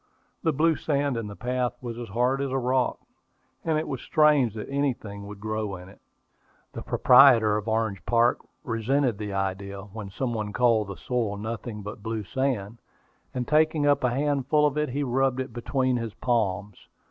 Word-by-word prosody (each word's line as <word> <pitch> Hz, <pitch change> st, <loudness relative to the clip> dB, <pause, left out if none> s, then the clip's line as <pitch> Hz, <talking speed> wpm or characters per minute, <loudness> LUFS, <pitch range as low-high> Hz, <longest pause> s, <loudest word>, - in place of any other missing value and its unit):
The 160 Hz, -, +2 dB
blue 160 Hz, +2 st, +2 dB
sand 140 Hz, -3 st, 0 dB
in 115 Hz, -2 st, -3 dB
the 100 Hz, -, -8 dB
path 125 Hz, +1 st, -1 dB
was 120 Hz, -2 st, -6 dB
as 120 Hz, -, -7 dB
hard 125 Hz, +6 st, +1 dB
as 140 Hz, -, -1 dB
a 135 Hz, -, -1 dB
rock, 130 Hz, 0 st, +1 dB, 0.7 s
and 160 Hz, -2 st, +1 dB
it 155 Hz, -, -2 dB
was 130 Hz, -, -4 dB
strange 150 Hz, -7 st, +3 dB
that 105 Hz, -, -6 dB
anything 120 Hz, -8 st, -3 dB
would 105 Hz, -1 st, -9 dB
grow 110 Hz, -1 st, -3 dB
in 90 Hz, +1 st, -11 dB
it. -, -, -18 dB, 0.7 s
The -, -, -6 dB
proprietor 120 Hz, -5 st, +6 dB
of 105 Hz, +1 st, -3 dB
Orange 110 Hz, -3 st, -1 dB
Park 120 Hz, +1 st, +3 dB, 0.2 s
resented 120 Hz, 0 st, 0 dB
the 105 Hz, -1 st, -4 dB
idea, 100 Hz, 0 st, -3 dB
when 105 Hz, 0 st, -8 dB
some 120 Hz, +5 st, -3 dB
one 105 Hz, -2 st, -3 dB
called 115 Hz, -4 st, +3 dB
the 100 Hz, -2 st, -7 dB
soil 110 Hz, -, -2 dB
nothing 110 Hz, 0 st, -5 dB
but 105 Hz, +1 st, -8 dB
blue 110 Hz, 0 st, -3 dB
sand; 115 Hz, -2 st, -2 dB, 0.6 s
and 125 Hz, -1 st, -2 dB
taking 155 Hz, 0 st, +3 dB
up 145 Hz, -1 st, +3 dB
a 125 Hz, -, +3 dB
handful 145 Hz, +2 st, +1 dB
of 145 Hz, -1 st, +1 dB
it, 150 Hz, -1 st, 0 dB
he 140 Hz, +3 st, -2 dB
rubbed 130 Hz, 0 st, +1 dB
it 130 Hz, -2 st, -4 dB
between 130 Hz, +1 st, 0 dB
his 115 Hz, -2 st, -5 dB
palms. 105 Hz, -5 st, -1 dB
120 Hz, 185 wpm, -26 LUFS, 105-135 Hz, 0.7 s, proprietor